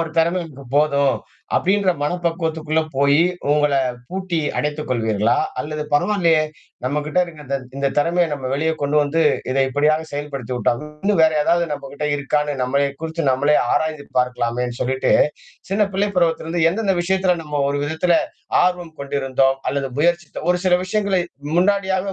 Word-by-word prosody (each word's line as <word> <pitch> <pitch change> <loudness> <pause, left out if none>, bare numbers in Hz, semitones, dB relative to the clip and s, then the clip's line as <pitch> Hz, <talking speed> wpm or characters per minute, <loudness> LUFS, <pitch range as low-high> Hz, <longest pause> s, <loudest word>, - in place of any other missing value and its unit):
ஒரு 165 -1 -2
திறமைக்கு 165 -5 -1
போதும். 140 -3 +3 0.4
அப்படின்ற 195 +1 +2
மன 150 +5 0
பக்குவத்துக்குள்ள 160 -2 0 0.2
போயி 140 +3 +4 0.3
உங்கள 150 0 +3 0.4
பூட்டி 185 -2 -2 0.2
அடைத்துக் 150 0 -2
கொள்வீர்களா? 110 -1 +1 0.2
அல்லது 150 +2 -4
பரவால்லையே! 165 -1 +3 0.4
நம்மகிட்ட 150 +4 -1
இருக்கத 150 -5 -6 0.2
இந்த 140 0 0
திறமைய 170 +4 +2
நம்ம 140 -2 -4
வெளிய 160 +4 +1
கொண்டு 145 +1 +1
வந்து 155 +3 +1 0.3
இத 130 - -1
எப்படியாது 150 +4 +1
செயல்படுத்தி 140 -4 -5
விட்டால் 120 +2 0 0.2
இன்னும் 200 -4 +2
வேற 160 0 +5
ஏதாவது 170 +2 +2
நம்மகிட்ட 140 0 -5
இருக்கான்னு 150 +1 0
நம்மளைய 140 +2 +1
குறிச்சு 160 +1 -3
நம்மளே 145 +3 +3 0.2
ஆராய்ந்து 155 -2 -1
பார்க்கலாமேன்னு 125 -1 -1
சொல்லிட்டு 130 +1 0 0.6
சின்ன 205 +1 +2
பிள்ளை 200 +2 +1
பருவத்தில 165 -2 +1
இருந்து 165 0 0
எந்தெந்த 200 0 0
விஷயத்துல 185 0 +2
நம்ம 150 -2 -3
ஒரு 145 - -1
விதத்தில 160 +3 +1 0.5
ஆர்வம் 175 -3 -1
கொண்டிருந்தோம், 135 -1 +1
அல்லது 140 -1 -1
முயற்சித்தோ 170 0 0
ஒரு 180 - +2
சில 185 -1 +4
விஷயங்களை 200 -1 0 0.4
முன்னாடியாக 190 0 +1
155 Hz, 145 wpm, -20 LUFS, 140-175 Hz, 0.6 s, வேற